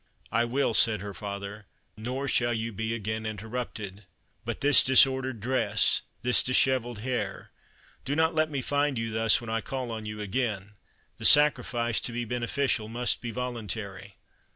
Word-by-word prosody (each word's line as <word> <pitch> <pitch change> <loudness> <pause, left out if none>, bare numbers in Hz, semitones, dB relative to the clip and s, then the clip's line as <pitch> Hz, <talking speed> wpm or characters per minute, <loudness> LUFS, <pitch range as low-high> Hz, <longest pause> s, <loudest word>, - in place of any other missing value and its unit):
"I 115 +1 +2
will," 125 0 0
said 110 -2 +3
her 100 0 -6
father; 100 0 -7 0.3
"nor 125 +5 -4
shall 120 -2 +1
you 115 +1 -4
be 110 +3 -3
again 110 0 -4
interrupted. 110 -2 -6 0.4
But - - -5
this 145 -1 +6
disordered 130 -2 +4
dress 130 +4 +2 0.2
this 125 0 +3
dishevelled 130 -2 +1
hair 115 -5 -4 0.5
do 140 - -2
not 160 +1 +2
let 155 0 +1
me 140 -4 -3
find 145 -2 0
you 115 0 -3
thus 110 0 +3
when 115 -1 -7
I 115 0 -1
call 130 -2 -5
on 110 -1 -6
you 105 0 -6
again; 105 -2 -3 0.5
the - - -4
sacrifice, 125 -6 +4
to - - -3
be 120 0 -3
beneficial, 120 -1 -1
must 120 +2 -1
be 120 - -5
voluntary." 105 -5 -5
115 Hz, 160 wpm, -27 LUFS, 110-130 Hz, 0.5 s, this